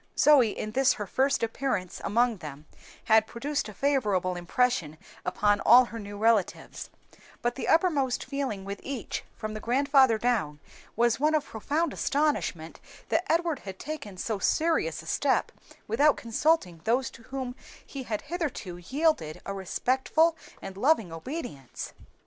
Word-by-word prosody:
Zoe, 280 -7 +6
in 215 - -4
this 265 +3 +3
her 210 - -5
first 265 +6 +1
appearance 225 -5 -2
among 235 +1 +2
them, 150 -3 -9 0.4
had 220 -1 +4
produced 280 +1 -3
a - - -9
favorable 210 -10 +1
impression 175 - 0 0.3
upon 205 +2 +2
all 245 +5 +7
her 230 -1 -8
new 205 -1 -8
relatives; 220 -2 0 0.5
but 240 0 +1
the 265 - -5
uppermost 295 -7 +2
feeling 265 -9 -3
with 200 0 -5
each, 270 -4 -5
from 215 0 -5
the 215 - -5
grandfather 265 0 +4
down, 215 -11 0 0.4
was 235 +1 +2
one 305 +2 +3
of 300 -2 0
profound 290 +8 -2
astonishment 280 - -1 0.3
that 360 +1 +1
Edward 330 -3 +1
had 190 -2 -8
taken 220 -11 -7
so 215 +2 -2
serious 325 - +1
a - - -15
step - - +1 0.4
without 285 +7 +3
consulting 230 - 0
those 250 +4 +1
to - - -14
whom 255 +1 -5 0.3
he 275 - -7
had 220 -4 -3
hitherto 295 - -4
yielded 255 - 0
a 195 - -3
respectful 260 - +1 0.3
and 195 0 -7
loving 225 - +2
obedience. 165 - -7
240 Hz, 150 wpm, -28 LUFS, 200-280 Hz, 0.5 s, all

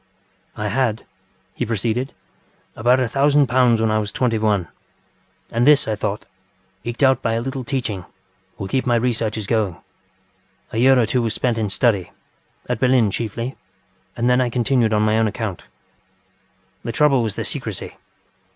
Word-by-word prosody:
ŌĆ£I 105 0 -2
had, 120 -1 +1
ŌĆØ - - -21 0.5
he - - -2
proceeded, 115 +4 -1 0.6
ŌĆ£about 125 +4 +3
a 125 - +1
thousand 140 +3 +3
pounds 125 -3 +3
when 110 -1 +1
I 110 - +2
was 105 -1 -3
twenty 115 -3 0
one, 105 -5 +1 0.8
and 120 +3 +1
this, 150 -1 +5
I 110 - 0
thought, 105 0 -3 0.6
eked 120 +4 -3
out 130 -1 +4
by 115 - 0
a 115 - 0
little 130 +2 -4
teaching, 115 -8 -3 0.5
would 95 0 -6
keep 130 -1 0
my 120 - +3
researches 115 -3 -1
going. 105 -5 0 0.9
A 110 - -2
year 130 +2 +6
or 120 - +3
two 120 +3 0
was 115 -2 -1
spent 120 -3 0
in 105 -2 -1
study, 100 -3 +1 0.6
at 125 -2 -2
Berlin 125 -5 +3
chiefly, 115 +5 -4 0.6
and 120 +1 0
then 125 +1 +4
I 125 - +1
continued 120 -1 +1
on 105 -1 +2
my 110 +1 +2
own 110 - +3
account. 105 -4 -4 1.2
The 115 - -3
trouble 140 +1 +3
was 110 -3 -2
the - - -3
secrecy. - - -5
115 Hz, 170 wpm, -21 LUFS, 110-125 Hz, 1.2 s, year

